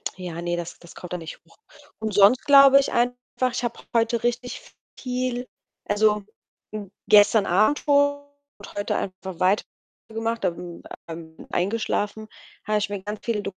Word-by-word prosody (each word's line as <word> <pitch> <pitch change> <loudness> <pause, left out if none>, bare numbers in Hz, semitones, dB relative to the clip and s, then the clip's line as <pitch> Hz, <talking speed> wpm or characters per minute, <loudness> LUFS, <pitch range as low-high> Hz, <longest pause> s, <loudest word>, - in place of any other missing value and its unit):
Ja, 175 -3 -6
ne, 175 0 -1
das 175 0 -6
das 170 - -15
kommt 180 0 -8
da 180 - -1
nicht 165 -2 -9
hoch. - - -24 0.4
Und 220 -1 -3
sonst 205 +6 +5
glaube 275 -1 +8
ich 275 - -1
einfach, 245 +1 +1 0.4
ich - - -3
habe 235 -1 -3 0.2
heute 230 0 +1
richtig 240 +1 -2 0.4
viel 250 -1 -3 0.4
also, 210 0 +2 0.8
gestern 205 0 +6
Abend 215 +11 +3
schon 285 0 +2 0.4
und 200 - -12
heute 205 0 -2
einfach 185 -2 -6
weiter 190 +3 +3 0.5
gemacht, 225 +1 -3
dann, 175 0 -4 0.3
ähm, 160 -1 -9
eingeschlafen, 205 +2 -1 0.4
habe 215 0 +1
ich 205 - -2
mir 200 -2 -4
ganz 210 +1 -5
viele 215 -3 -1
210 Hz, 155 wpm, -24 LUFS, 185-240 Hz, 0.8 s, glaube